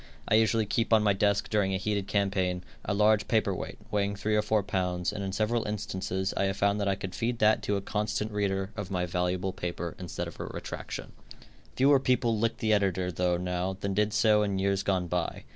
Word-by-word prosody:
I - - +1
usually 110 0 +4
keep 115 +3 -1
on 110 -1 +5
my 105 -1 +4
desk 100 +1 +1
during 100 -3 +2
a - - +1
heated 100 0 -2
campaign, 95 -3 0 0.2
a - - -3
large 105 +1 +3
paper 110 -4 +2
weight, - - -6
weighing 100 -1 0
three 105 +2 0
or 105 - +4
four 105 -1 +1
pounds, 90 -2 -1
and 100 -1 -4
in 95 - -3
several 110 +3 0
instances 95 -2 -2
I 100 - +1
have 95 +1 -1
found 100 +1 +2
that 100 - 0
I 100 - +2
could 95 -1 -6
feed 120 +2 -1
that 110 0 +4
to 100 - 0
a 100 - -1
constant 105 +1 -2
reader 100 -1 -1
of 105 -4 -5
my 90 -2 -1
valuable 90 +2 -1
paper 85 -1 -4
instead 90 -3 -4
of - - -11
a - - -4
retraction. - - -6 0.6
Fewer 140 +1 +5
people 125 -3 +2
lick 115 +1 0
the 110 -4 +1
editor 95 -3 +1
though, 90 0 +1
now, 90 +1 -2
than 100 0 -2
did 105 +2 +1
so 105 -1 +4
in 100 -2 0
years 100 0 +1
gone 95 -2 0
by. 85 -1 -2
100 Hz, 220 wpm, -29 LUFS, 95-105 Hz, 0.6 s, on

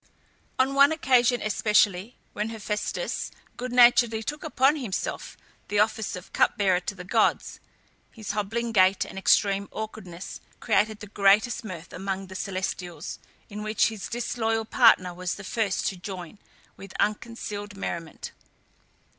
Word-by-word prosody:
On 265 +1 +2
one 280 +2 +6
occasion 255 -5 +3
especially, 210 0 +2 0.2
when 210 +1 -2
Hephæstus 220 - -3 0.3
good 250 0 -5
naturedly 240 -2 +5
took 295 +5 -5
upon 290 -1 +3
himself 230 -9 -4 0.3
the 205 - -1
office 215 0 +1
of 180 - -11
cup - - +2
bearer 190 -4 +3
to 200 +2 -5
the 180 - -8
gods, 180 - +1 0.5
his 220 -2 -6
hobbling 220 +3 -2
gait 190 -2 +4
and - - -11
extreme 200 +1 +3
awkwardness 195 -5 -7 0.2
created 215 0 +1
the - - -6
greatest 205 +4 +3
mirth 180 -5 -8
amongst 195 0 -4
the 190 - -9
celestials, 185 -3 -4 0.3
in 210 0 -7
which 215 0 +2
his 220 -3 -6
disloyal 225 -2 -1
partner 185 -4 +4
was 180 0 -3
the 200 - -10
first 205 -1 -1
to 195 - -1
join, 180 +1 -8 0.4
with 195 -1 -11
unconcealed 210 -2 -3
merriment. 170 -4 -5
210 Hz, 140 wpm, -26 LUFS, 190-230 Hz, 0.5 s, one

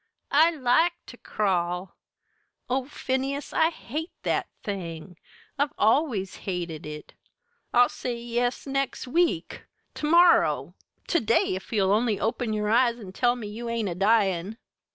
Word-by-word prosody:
I 315 +4 +6
like 320 +3 +2
ter 245 - -12
crawl. 180 -3 -1 0.7
Oh, 255 +1 0
Phineas, 275 0 -3
I 320 0 +4
hate 315 +1 -6
that - - 0 0.2
thing 180 -3 -6 0.4
I've 285 0 +1
always 220 - +1
hated 170 -5 -5
it! 150 0 -9 0.6
I'll 245 0 +6
say 245 0 -4
yes 240 +1 -2
next 275 -1 -2
week 250 - 0 0.3
to 300 - -3
morrow 345 +1 +4 0.3
to 340 - +2
day 225 -5 +2
if 190 - -7
you'll 195 -4 +2
only 220 -1 +1
open 225 +1 -1
your 210 0 -1
eyes 240 0 +3
and 195 -5 -10
tell 245 +3 +2
me 240 -3 -7
you 230 +3 -6
ain't 230 -3 -1
a - - -2
dyin'!" 195 0 +1
230 Hz, 145 wpm, -26 LUFS, 195-265 Hz, 0.7 s, I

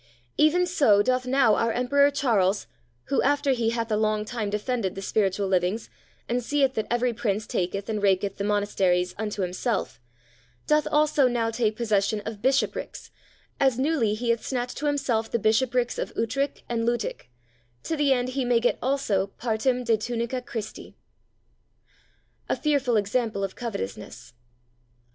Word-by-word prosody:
Even 335 +4 +4
so 275 - +4
doth 255 +1 0
now 250 -4 +4
our 230 +2 +1
Emperor 280 +4 +3
Charles, 215 -9 +1 0.4
who, 275 - 0
after 285 0 +2
he 235 -3 +1
hath 230 -1 -2
a - - +3
long 215 0 0
time 220 -2 -3
defended 210 -1 -2
the 195 - -5
spiritual 195 -1 0
livings, 190 +4 0 0.4
and 245 +1 -1
seeth 275 +1 +1
that 220 -3 -2
every 240 0 +1
Prince 215 -2 -1
taketh 195 +1 -2
and 215 -2 -2
raketh 195 0 +1
the 200 - -3
monasteries 195 -3 +1
unto 210 -2 -2
himself, 185 - -2 0.7
doth 300 0 +2
also 300 -2 +3
now 235 -2 0
take 225 -2 0
possession 215 -2 +1
of 210 -1 -7
bishoprics, 265 +3 -1 0.5
as 265 -3 +3
newly 260 -6 +1
he 235 +2 0
hath 235 - -1
snatched 250 -1 -3
to 295 - -2
himself 255 -6 0
the - - 0
bishoprics 240 +3 +1
of - - -3
Utrich 275 +5 -1
and 230 -1 -1
Luttich, 235 - -2 0.5
to 325 - -2
the 290 -2 +2
end 250 -1 +1
he 265 +1 -2
may 245 -1 +3
get 245 - +1
also 245 -8 0
partem 245 +2 0
de 225 -1 +3
tunica 235 +3 -3
Christi. 220 -3 -7 1.5
A - - +2
fearful 275 -6 +1
Example 210 0 -1
of 195 - -3
Covetousness. 125 - -6
230 Hz, 160 wpm, -25 LUFS, 210-255 Hz, 1.5 s, Even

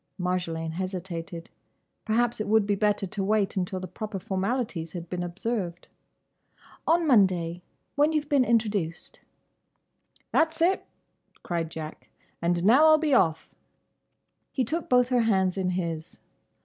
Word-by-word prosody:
Marjolaine 175 -3 -2
hesitated. 175 -1 -5 0.5
Perhaps 230 +1 +1
it - - -3
would 220 0 +4
be 205 - +1
better 205 0 +1
to 195 +1 -3
wait 205 0 +1
until 185 0 -2
the 185 - -5
proper 210 +3 -5
formalities 190 -3 -2
had 175 -2 -6
been 180 +1 -4
observed. 180 0 -3 1.0
"On 335 +1 +3
Monday; 180 - +3 0.3
when 295 +2 +3
you've 305 -2 -1
been 285 -3 +3
introduced." 210 -8 -1 1.1
"That's 320 0 +2
it!" 360 +4 +2 0.6
cried 170 -2 -2
Jack. 160 -1 -8 0.3
"And 170 0 +1
now 260 +10 +6
I'll 310 0 +7
be 310 -2 0
off." 160 -10 +2 1.0
He 260 - 0
took 325 +8 -3
both 250 0 +4
her 250 -2 +3
hands 190 -5 +2
in 190 -2 -1
his. 170 -3 -4
195 Hz, 135 wpm, -27 LUFS, 175-240 Hz, 1.1 s, I'll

